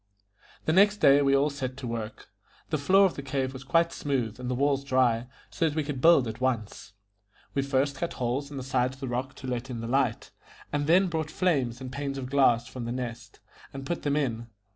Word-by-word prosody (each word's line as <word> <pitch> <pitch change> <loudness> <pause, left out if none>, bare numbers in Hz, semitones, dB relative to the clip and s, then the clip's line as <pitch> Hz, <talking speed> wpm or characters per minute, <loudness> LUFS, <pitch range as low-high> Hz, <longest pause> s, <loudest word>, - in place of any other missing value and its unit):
The 155 - +2
next 205 +3 +5
day 140 -5 +6
we 140 -1 +3
all 145 +2 +2
set 130 -2 -5
to 140 - -7
work; 115 -2 -6 0.4
the 155 - 0
floor 190 +7 +5
of 185 - +1
the - - -6
cave 135 -1 -2
was 130 0 -8
quite 165 +4 +2
smooth, 125 -6 -2
and 125 -1 -4
the 125 - 0
walls 140 +1 +1
dry, 125 -3 +2 0.2
so 165 - +1
that 150 - -7
we 155 - 0
could 140 -3 -5
build 165 -6 +6
at 110 +2 -6
once. 110 -5 -2 0.6
We 140 - +1
first 135 0 0
cut 170 - -3
holes 130 +3 -2
in 145 - -8
the 130 - -4
sides 130 0 0
of - - -20
the 135 - -5
rock 125 +3 -3
to 130 - -9
let 125 +1 -3
in 120 -2 -5
the 115 - -5
light, 125 -2 0 0.4
and 145 0 0
then 180 +4 +5
brought 160 -3 -2
frames 140 -9 0
and 130 -1 -6
panes 140 0 -4
of 130 -1 -6
glass 125 -4 +4
from 125 -1 -7
The 120 - -3
Nest, 120 -2 -6 0.3
and 135 0 -7
put 170 +4 -3
them 145 -1 0
in. 120 -6 -1
135 Hz, 230 wpm, -27 LUFS, 125-145 Hz, 0.6 s, day